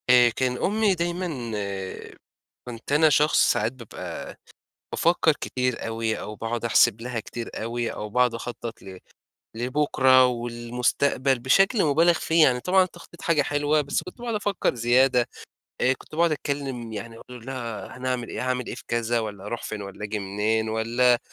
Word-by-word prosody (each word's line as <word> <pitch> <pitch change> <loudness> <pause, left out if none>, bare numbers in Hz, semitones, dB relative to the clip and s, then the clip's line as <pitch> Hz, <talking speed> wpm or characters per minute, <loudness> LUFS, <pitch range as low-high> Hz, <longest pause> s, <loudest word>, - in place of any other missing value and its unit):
آآ 125 -1 +7
كان 125 +1 -1
أمي 210 - +2
دايمًا 175 +1 -2 1.4
كنت 115 +2 -8
أنا 155 +2 +5
شخص 150 +1 +4
ساعات 110 +2 0
بابقى 120 -5 -8 0.6
بافكّر 165 -1 +3
كتير 125 -2 -2
أوي 115 0 -2
أو 105 - -6
باقعد 115 +1 -3
أحسب 115 -1 +4
لها 120 -1 -3
كتير 115 +2 -7
أوي 115 +1 -2
أو 105 - -6
باقعد 125 +2 +2
أخطّط 115 -1 -6
ل 95 -1 -10 0.6
لبُكرة 130 +1 +4
والمستقبل 125 +2 0
بشكل 195 - +3
مبالغ 165 +4 +4
فيه. 165 -1 +3
يعني 125 -4 +4
طبعًا 185 +7 +4
التخطيط 175 -1 -11
حاجة 165 -3 +2
حلوة، 145 +1 +1
بس 140 -1 -2
كنت 185 - -11
باقعد 235 -2 -3
أفكّر 205 -8 0
زيادة، 125 +1 +3 0.5
آآ 130 - +4
كنت 135 - -10
باقعد 170 0 +3
أتكلّم 135 -6 -4
يعني 110 +2 -7
أقول 125 -1 -12
لها 120 -4 -6
هنعمل 125 -2 -2
إيه، - - -5
هاعمل 125 -1 -1
إيه - - -5
في - - -10
كذا 120 0 0
والّا 105 -3 -6
هاروح 115 +3 -4
فين 105 -1 -5
والّا 100 +1 -8
آجي 105 +1 -3
منين 105 +3 -1
والّا 120 +3 +2
125 Hz, 160 wpm, -25 LUFS, 115-145 Hz, 1.4 s, آآ